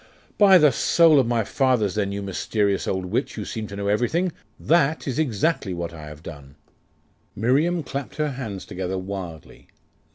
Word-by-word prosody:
'By 195 Hz, -3 st, +8 dB
the 150 Hz, -4 st, +5 dB
soul 155 Hz, +5 st, +4 dB
of 130 Hz, -, +2 dB
my 115 Hz, -1 st, +1 dB
fathers, 125 Hz, -4 st, +1 dB
then, 100 Hz, -2 st, -1 dB
you 100 Hz, 0 st, -4 dB
mysterious 100 Hz, +1 st, -1 dB
old 95 Hz, -1 st, -1 dB
witch, 90 Hz, -, -2 dB
who -, -, -5 dB
seem 110 Hz, -1 st, -5 dB
to 100 Hz, -, -8 dB
know 100 Hz, 0 st, -3 dB
everything, 125 Hz, -, +1 dB, 0.3 s
that 160 Hz, -2 st, +2 dB
is 135 Hz, +2 st, -2 dB
exactly 135 Hz, -, 0 dB
what 85 Hz, -1 st, -5 dB
I 75 Hz, -2 st, -9 dB
have 75 Hz, +1 st, -11 dB
done.' 70 Hz, -4 st, -10 dB, 0.8 s
Miriam 150 Hz, -, +1 dB
clapped 140 Hz, 0 st, -6 dB
her 150 Hz, -1 st, -1 dB
hands 110 Hz, -8 st, -6 dB
together 95 Hz, +1 st, -4 dB
wildly. 95 Hz, -4 st, -7 dB
110 Hz, 170 wpm, -23 LUFS, 95-145 Hz, 0.8 s, By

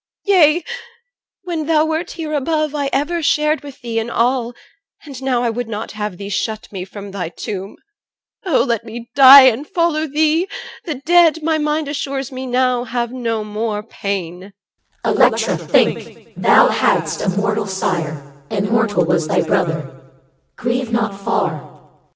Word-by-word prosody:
Yea, 350 Hz, -4 st, +4 dB, 0.8 s
when 335 Hz, -4 st, -4 dB
thou 315 Hz, -1 st, +3 dB
wert 320 Hz, +3 st, -2 dB
here 315 Hz, -3 st, -5 dB
above, 305 Hz, +1 st, 0 dB
I 285 Hz, -2 st, -1 dB
ever 320 Hz, +5 st, -1 dB
shared 300 Hz, +1 st, +1 dB
with 280 Hz, -1 st, -12 dB
thee 230 Hz, -2 st, -2 dB
in 225 Hz, +1 st, -4 dB
all, 240 Hz, 0 st, 0 dB, 0.5 s
and 275 Hz, -3 st, -9 dB
now 255 Hz, -2 st, 0 dB
I 235 Hz, -, +1 dB
would 245 Hz, +1 st, -4 dB
not 220 Hz, 0 st, -5 dB
have 210 Hz, -3 st, -5 dB
thee 200 Hz, +1 st, -7 dB
shut 215 Hz, +2 st, -3 dB
me 185 Hz, -3 st, -5 dB
from 200 Hz, +1 st, -9 dB
thy 185 Hz, -4 st, -4 dB
tomb. 195 Hz, +3 st, -6 dB, 0.7 s
Oh! 350 Hz, -8 st, +2 dB
let 235 Hz, -2 st, -1 dB
me 235 Hz, +1 st, -9 dB
die 275 Hz, 0 st, +10 dB
and 260 Hz, +3 st, +3 dB
follow 330 Hz, -2 st, 0 dB
thee! 310 Hz, +4 st, +1 dB, 0.4 s
the 320 Hz, -5 st, -3 dB
dead, 325 Hz, +2 st, +3 dB
My 320 Hz, 0 st, +1 dB
mind 300 Hz, 0 st, -1 dB
assures 275 Hz, -2 st, -4 dB
me 260 Hz, 0 st, -6 dB
now, 250 Hz, -1 st, +1 dB
have 240 Hz, 0 st, -3 dB
no 230 Hz, -4 st, -2 dB
more 210 Hz, 0 st, -3 dB
pain. 195 Hz, -3 st, -5 dB, 0.5 s
CH. -, -, +1 dB
Electra, -, -, +3 dB
think! -, -, -1 dB
Thou -, -, +5 dB
hadst -, -, +1 dB
a -, -, 0 dB
mortal 210 Hz, 0 st, 0 dB
sire, 180 Hz, -6 st, -2 dB, 0.3 s
And 200 Hz, 0 st, -2 dB
mortal 220 Hz, -6 st, +2 dB
was 165 Hz, -1 st, +1 dB
thy -, -, +2 dB
brother. 160 Hz, -6 st, -2 dB, 0.5 s
Grieve 240 Hz, 0 st, -2 dB
not 230 Hz, -3 st, 0 dB
far. 190 Hz, -5 st, -1 dB
OR. -, -, -20 dB
240 Hz, 165 wpm, -18 LUFS, 205-300 Hz, 0.8 s, die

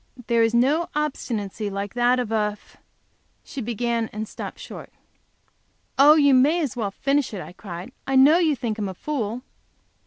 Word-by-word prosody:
"There 235 Hz, -1 st, +2 dB
is 225 Hz, +1 st, +2 dB
no 290 Hz, +8 st, +2 dB
obstinacy 225 Hz, -8 st, -3 dB
like 200 Hz, 0 st, -5 dB
that 245 Hz, +1 st, +3 dB
of 245 Hz, -3 st, -2 dB
a 215 Hz, -2 st, +1 dB
f -, -, -24 dB, 0.3 s
," -, -, -43 dB
she 275 Hz, -, -7 dB, 0.3 s
and 225 Hz, -2 st, -2 dB
stopped -, -, -7 dB
short. -, -, -10 dB, 1.1 s
"Oh, 295 Hz, +2 st, +8 dB
you 285 Hz, -3 st, +5 dB
may 285 Hz, +7 st, +4 dB
as 290 Hz, -8 st, -2 dB
well 220 Hz, -4 st, -2 dB
finish 275 Hz, +3 st, -1 dB
it!" -, -, -5 dB
I -, -, -10 dB
cried. 180 Hz, +3 st, -8 dB, 0.2 s
"I 270 Hz, -, 0 dB
know 285 Hz, +6 st, +7 dB
you 315 Hz, -4 st, +2 dB
think 230 Hz, -4 st, -4 dB
him 205 Hz, -2 st, -2 dB
a 190 Hz, -, -7 dB
fool." 245 Hz, -2 st, -3 dB
240 Hz, 180 wpm, -23 LUFS, 215-280 Hz, 1.1 s, Oh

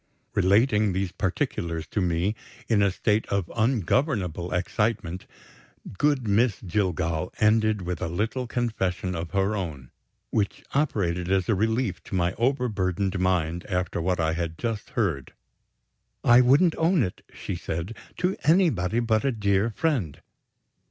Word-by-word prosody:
Relating 105 Hz, +1 st, +3 dB
these 95 Hz, -1 st, -1 dB
particulars 85 Hz, -2 st, -2 dB
to 105 Hz, -, -2 dB
me, 90 Hz, +3 st, +1 dB, 0.3 s
in 110 Hz, -3 st, +3 dB
a 100 Hz, -, +4 dB
state 105 Hz, +3 st, 0 dB
of 100 Hz, -4 st, -2 dB
ungovernable 110 Hz, -, 0 dB
excitement, 95 Hz, -1 st, -1 dB, 0.7 s
good 145 Hz, -1 st, +1 dB
Miss 105 Hz, +1 st, +2 dB
Jillgall 90 Hz, -3 st, -1 dB
ended 110 Hz, -2 st, +3 dB
with 90 Hz, 0 st, -4 dB
a 85 Hz, -, -1 dB
little 110 Hz, +9 st, -2 dB
confession 95 Hz, -7 st, -2 dB
of 85 Hz, -1 st, -4 dB
her 100 Hz, +4 st, 0 dB
own, 75 Hz, -10 st, -5 dB, 0.4 s
which 100 Hz, -2 st, -1 dB
operated 90 Hz, -, 0 dB
as 95 Hz, -2 st, +2 dB
a -, -, +3 dB
relief 110 Hz, +1 st, 0 dB
to -, -, -5 dB
my 90 Hz, 0 st, +1 dB
overburdened 100 Hz, -7 st, 0 dB
mind 90 Hz, -2 st, 0 dB
after 90 Hz, -2 st, -1 dB
what 90 Hz, +1 st, 0 dB
I 80 Hz, -1 st, +1 dB
had 80 Hz, -1 st, -3 dB
just 115 Hz, -2 st, -3 dB
heard. 85 Hz, -, -1 dB, 0.9 s
"I 120 Hz, +1 st, +7 dB
wouldn't 145 Hz, +7 st, +5 dB
own 165 Hz, -2 st, +3 dB
it," 90 Hz, -, -4 dB
she -, -, -5 dB
said, 85 Hz, +7 st, -4 dB, 0.2 s
"to 180 Hz, +2 st, 0 dB
anybody 125 Hz, -, +3 dB
but 110 Hz, -2 st, +1 dB
a 135 Hz, -, +2 dB
dear 100 Hz, -1 st, +1 dB
friend. 120 Hz, -, -1 dB
100 Hz, 140 wpm, -26 LUFS, 90-115 Hz, 0.9 s, I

